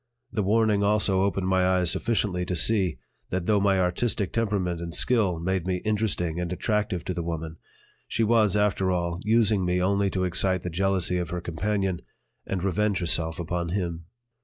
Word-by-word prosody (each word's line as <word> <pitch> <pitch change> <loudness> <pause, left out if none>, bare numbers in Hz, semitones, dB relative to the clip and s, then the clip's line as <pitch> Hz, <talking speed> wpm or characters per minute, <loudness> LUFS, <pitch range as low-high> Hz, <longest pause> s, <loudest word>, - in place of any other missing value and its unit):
The 105 - -1
warning 105 0 +2
also 100 -2 +2
opened 95 -1 0
my 95 0 +2
eyes 90 -2 +2
sufficiently 105 -6 0
to 90 - -2
see 95 - +2 0.3
that 90 -1 -2
though 105 0 +3
my 100 -1 +2
artistic 95 +3 0
temperament 100 -7 -1
and 85 -1 -4
skill 105 -9 +2
made 95 +1 -1
me 95 - +1
interesting 100 -6 -1
and 90 -1 -3
attractive 105 -1 -1
to 90 - -2
the 85 - -3
woman, 80 -1 -5 0.5
she 115 - 0
was, 110 -3 +3
after 105 -2 +1
all, 85 -1 -1
using 110 -2 +2
me 90 0 +1
only 100 +2 +1
to 95 -1 -1
excite 90 0 +1
the 90 - -4
jealousy 90 0 +1
of 85 -3 -3
her 90 - -3
companion 95 +2 -2 0.5
and 95 -2 -2
revenge 100 +1 +1
herself 80 -1 0
upon 85 0 -2
him. 85 -3 -3
95 Hz, 180 wpm, -26 LUFS, 90-105 Hz, 0.5 s, though